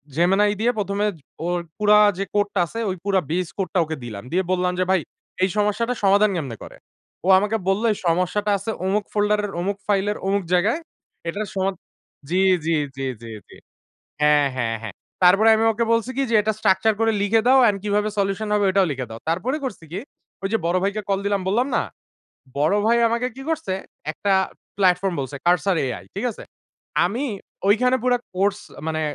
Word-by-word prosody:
Gemini 190 +5 +3
দিয়ে 235 +3 +3
১ম 200 -1 -2
এ - - +3 0.4
ওর 175 0 0 0.2
পুরা 210 0 +5 0.2
যে 195 - -1
কোড 205 0 +2
টা - - +2
আছে, 230 - -6
ওই 185 - -2
পুরা 195 -1 +3
বেস 180 +1 0
কোড 190 -4 -2
টা 185 - +3
ওকে 160 0 -4
দিলাম। 110 -4 -7
দিয়ে 185 +2 +1
বললাম 180 0 +1
যে - - +3
ভাই 190 - +4 0.4
এই 190 - +3
সমস্যাটা 210 +4 +1
সমাধান 200 +2 +5
কেমনে 135 -9 -4
করে? - - -11 0.5
ও - - -1
আমাকে 210 +3 +1
বলল 195 +3 +1
এই - - -8
সমস্যাটা 185 +5 +1
আছে 200 +3 -4
অমুক 200 +2 +1
ফোল্ডার 210 0 +2
এর, 205 - -5
অমুক 200 +2 -2
ফাইলের, 205 +1 +1
অমুক 200 0 +1
জায়গায়। 205 - +2 0.5
এটার 205 +5 -3
সমা 190 0 +1 0.6
জি, 180 - +1 0.3
জি, 165 - +1 0.2
জি, 135 0 -4 0.2
জি, 115 - -9 0.2
জি। - - -15 0.7
হ্যাঁ, 150 -1 +5
হ্যাঁ, 115 -3 -1
হ্যাঁ। 110 -3 -7 0.3
তারপরে 195 +5 +6
আমি 220 - +1
ওকে 230 +1 -1
বলছি 230 +2 0
কি? - - +2
যে - - +3
এটা 215 +1 0
স্ট্রাকচার 215 +2 +3
করে 225 0 +3
লিখে 210 +2 +3
দাও। 265 +1 +6
অ্যান্ড 210 -4 +4
কিভাবে 210 0 +1
সলিউশন 200 +2 0
হবে 205 -1 +2
ওটাও 190 0 +3
লিখে 130 -2 -4
দাও। 115 0 -8
তারপরে 190 - 0
করছি 225 -9 -6
কি? 185 - -3 0.4
ওই - - +1
যে - - +4
বড় 170 +2 +2
ভাইকে 200 +2 -1
কল 195 -1 +1
দিলাম 200 -1 +1
বললাম 235 +7 +2
না? - - +3 0.8
বড় 155 +7 +3
ভাই 235 +1 +4
আমাকে 235 +2 0
কি 270 - -8
করছে? 320 -10 -2 0.4
একটা 200 +3 -1 0.4
প্লাটফর্ম 185 -1 +2
বলছে 140 +1 -5
Cursor 180 +2 +3
AI 120 -9 -4
ঠিক 200 +6 -3
আছে? - - -11 0.6
আমি 230 +11 -1 0.4
ঐখানে 250 +5 +4
পুরা 250 -1 +2 0.2
কোর্স 195 +2 +1 0.3
মানে 160 0 -1
200 Hz, 195 wpm, -22 LUFS, 180-215 Hz, 0.8 s, তারপরে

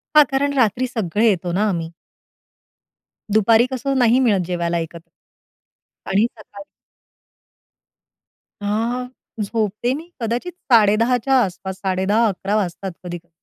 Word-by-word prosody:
हां, 300 - +9
कारण 280 +1 +1
रात्री 250 0 +2
सगळे 220 -2 0
येतो 180 -3 -1
ना 200 +5 +1
आम्ही. 165 -3 -3 1.4
दुपारी 225 +2 +5
कसं 270 +2 -2
नाही 245 +1 +4
मिळत 195 -5 +2
जेवायला 170 -1 -1
एकत्र. 165 +1 -8 1.0
आणि 205 +3 +3
सकाळी 200 -1 -12 2.0
अ 205 - -3 0.8
झोपते 215 +3 -1
मी 320 +5 -7
कदाचित 235 +9 -2 0.2
10:30च्या 230 +4 +4
आसपास, 190 0 -5
10:30-11:00 195 +1 0
वाजतात 195 -1 -2
कधी-कधी. 175 -1 -8
210 Hz, 105 wpm, -20 LUFS, 185-235 Hz, 2.0 s, हां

